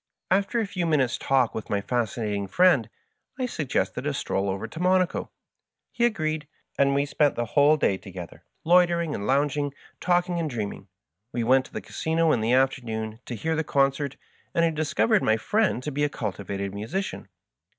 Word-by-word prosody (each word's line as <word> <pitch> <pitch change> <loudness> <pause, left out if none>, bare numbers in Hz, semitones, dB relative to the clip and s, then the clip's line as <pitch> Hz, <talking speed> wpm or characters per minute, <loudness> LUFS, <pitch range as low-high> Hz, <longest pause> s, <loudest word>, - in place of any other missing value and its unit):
After 200 +5 +2
a 225 - +1
few 180 -3 -2
minutes' 135 -6 +1
talk 130 -4 +2
with 110 - -6
my 100 - +1
Fascinating 105 -2 -2
Friend, 145 - +4 0.5
I 255 - -1
suggested 155 - -2
a - - -1
stroll 100 +1 -1
over 95 +3 -3
to 160 - -9
Monaco. 185 0 +1 0.6
He 235 - +1
agreed, 155 -9 -1 0.3
and 140 0 +3
we 140 +1 +2
spent 145 0 +2
the 120 - -1
whole 145 +1 +5
day 100 -9 +2
together, 95 -3 -10 0.2
loitering 170 -2 +3
and 100 - -4
lounging, 145 +1 +1 0.2
talking 175 0 +1
and 160 -2 -1
dream 110 -6 -3
ing. 100 - -14 0.4
We 120 -2 -1
went 130 +3 +4
to - - -24
the - - -4
Casino 160 0 0
in 120 - +2
the 110 +2 +1
afternoon 115 -4 0
to 120 - -4
hear 160 +9 -1
the 160 - 0
concert, 140 0 +1 0.4
and 170 - +4
I 165 - +2
discovered 160 +7 +2
my 110 - +3
friend 205 - +1
to 150 - -3
be 145 +1 -1
a 145 - +2
culti 100 -7 -5
vated 100 0 -3
musician. 115 - -4
140 Hz, 185 wpm, -26 LUFS, 115-165 Hz, 0.6 s, whole